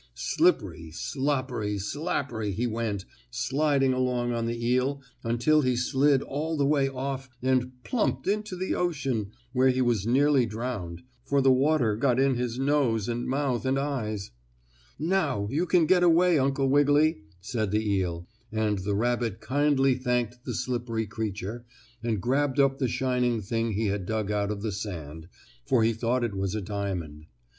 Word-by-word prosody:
Slippery, 80 Hz, 0 st, +1 dB
sloppery, 130 Hz, -, -2 dB
slappery 115 Hz, -, -2 dB
he 120 Hz, -, 0 dB
went, 110 Hz, -4 st, -2 dB, 0.2 s
sliding 135 Hz, -, +1 dB
along 125 Hz, -1 st, 0 dB
on 115 Hz, 0 st, -1 dB
the 115 Hz, 0 st, -2 dB
eel 130 Hz, +3 st, +1 dB, 0.2 s
until 120 Hz, +7 st, +3 dB
he 130 Hz, -2 st, +1 dB
slid 135 Hz, +3 st, +2 dB
all 155 Hz, +3 st, -3 dB
the 140 Hz, -, +2 dB
way 140 Hz, -1 st, +2 dB
off 135 Hz, 0 st, -4 dB
and 130 Hz, -1 st, +1 dB
plumped 245 Hz, -4 st, -1 dB
into 210 Hz, -1 st, -1 dB
the 185 Hz, +1 st, -2 dB
ocean, 135 Hz, -, -1 dB, 0.2 s
where 130 Hz, 0 st, +4 dB
he 130 Hz, 0 st, +1 dB
was 120 Hz, -5 st, +1 dB
nearly 135 Hz, 0 st, +4 dB
drowned, 110 Hz, -6 st, -5 dB, 0.2 s
for 140 Hz, +2 st, +1 dB
the 135 Hz, -1 st, +5 dB
water 130 Hz, -4 st, +3 dB
got 125 Hz, +2 st, +2 dB
in 135 Hz, 0 st, +3 dB
his 120 Hz, -1 st, -2 dB
nose 135 Hz, -6 st, +1 dB
and 120 Hz, 0 st, -2 dB
mouth 130 Hz, -3 st, 0 dB
and 135 Hz, +1 st, +1 dB
eyes. 115 Hz, -8 st, -3 dB, 0.7 s
"Now, 155 Hz, -, 0 dB
you 165 Hz, +6 st, 0 dB
can 175 Hz, -2 st, +4 dB
get 180 Hz, +2 st, +4 dB
away, 175 Hz, -1 st, +5 dB
Uncle 135 Hz, 0 st, +1 dB
Wiggily," 145 Hz, -, +3 dB, 0.2 s
said 110 Hz, +2 st, -2 dB
the 105 Hz, +2 st, 0 dB
eel, 90 Hz, -4 st, -1 dB, 0.2 s
and 110 Hz, -2 st, 0 dB
the 100 Hz, +2 st, -1 dB
rabbit 120 Hz, -1 st, 0 dB
kindly 135 Hz, +2 st, +2 dB
thanked 125 Hz, -1 st, -2 dB
the -, -, -3 dB
slippery 120 Hz, -3 st, -2 dB
creature, 105 Hz, +1 st, -4 dB, 0.4 s
and 115 Hz, -3 st, -1 dB
grabbed 135 Hz, +5 st, 0 dB
up 135 Hz, -1 st, +3 dB
the 130 Hz, -, +1 dB
shining 125 Hz, -1 st, 0 dB
thing 115 Hz, +2 st, -2 dB
he 110 Hz, +3 st, 0 dB
had 100 Hz, -3 st, -2 dB
dug 110 Hz, -2 st, -1 dB
out 100 Hz, -1 st, 0 dB
of 105 Hz, -1 st, -4 dB
the 110 Hz, -, -1 dB
sand, 80 Hz, -6 st, -6 dB, 0.4 s
for 120 Hz, -4 st, +3 dB
he 115 Hz, +1 st, +3 dB
thought 120 Hz, +3 st, 0 dB
it 115 Hz, -3 st, -1 dB
was 95 Hz, +1 st, -2 dB
a -, -, -1 dB
diamond. 90 Hz, -7 st, -4 dB
125 Hz, 165 wpm, -27 LUFS, 110-140 Hz, 0.7 s, the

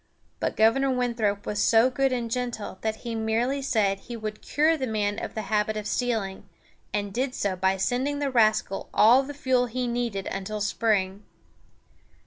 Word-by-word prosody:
But -, -, -1 dB
Governor 230 Hz, +5 st, +4 dB
Winthrop 235 Hz, -5 st, 0 dB
was 210 Hz, -1 st, -1 dB
so 230 Hz, +4 st, +4 dB
good 270 Hz, +1 st, +1 dB
and 235 Hz, -3 st, -2 dB
gentle 240 Hz, -5 st, -3 dB
that 220 Hz, 0 st, -3 dB
he 235 Hz, -, -3 dB
merely 225 Hz, +5 st, 0 dB
said 205 Hz, -7 st, +1 dB
he 235 Hz, +2 st, -8 dB
would 215 Hz, -1 st, -6 dB
cure 310 Hz, +3 st, +2 dB
the 265 Hz, -4 st, -3 dB
man 210 Hz, -2 st, -1 dB
of -, -, -6 dB
the 220 Hz, -, -3 dB
habit 215 Hz, +1 st, 0 dB
of 210 Hz, -, -4 dB
stealing, 220 Hz, -5 st, -2 dB, 0.4 s
and 205 Hz, -1 st, -2 dB
did 255 Hz, +3 st, -1 dB
so 200 Hz, -2 st, -1 dB
by 190 Hz, +1 st, +1 dB
sending 260 Hz, +8 st, 0 dB
the 285 Hz, -1 st, -1 dB
rascal 215 Hz, -4 st, +2 dB
all 235 Hz, +5 st, +7 dB
the 285 Hz, +1 st, -7 dB
fuel 255 Hz, -3 st, +1 dB
he 250 Hz, +2 st, -2 dB
needed 235 Hz, -5 st, -2 dB
until 195 Hz, +2 st, -4 dB
spring. 205 Hz, -2 st, 0 dB
225 Hz, 175 wpm, -26 LUFS, 205-250 Hz, 0.4 s, all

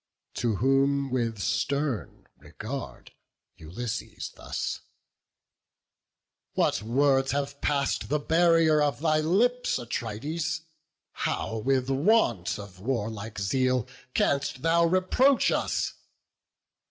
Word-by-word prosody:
To 115 Hz, -3 st, 0 dB
whom, 135 Hz, +3 st, +2 dB
with 115 Hz, -3 st, -1 dB
stern 140 Hz, +4 st, -2 dB
regard, 130 Hz, +5 st, -8 dB, 0.5 s
Ulysses 105 Hz, +9 st, -5 dB
thus: -, -, -4 dB, 1.7 s
"What -, -, +1 dB
words 135 Hz, +4 st, +2 dB
have 140 Hz, 0 st, -3 dB
pass'd 140 Hz, -2 st, 0 dB
the 150 Hz, -, +2 dB
barrier 165 Hz, 0 st, +4 dB
of 145 Hz, -1 st, +1 dB
thy 155 Hz, -1 st, +3 dB
lips, 235 Hz, +11 st, +2 dB
Atrides? 145 Hz, +8 st, -3 dB, 0.5 s
how 110 Hz, -, -2 dB
with 130 Hz, +2 st, +1 dB
want 135 Hz, -, +2 dB
of 100 Hz, -3 st, -10 dB
warlike 110 Hz, -1 st, -3 dB
zeal 125 Hz, +4 st, +1 dB, 0.3 s
Canst 140 Hz, -2 st, 0 dB
thou 170 Hz, +1 st, +4 dB
reproach 185 Hz, +10 st, +3 dB
us? -, -, 0 dB
135 Hz, 95 wpm, -27 LUFS, 115-155 Hz, 1.7 s, barrier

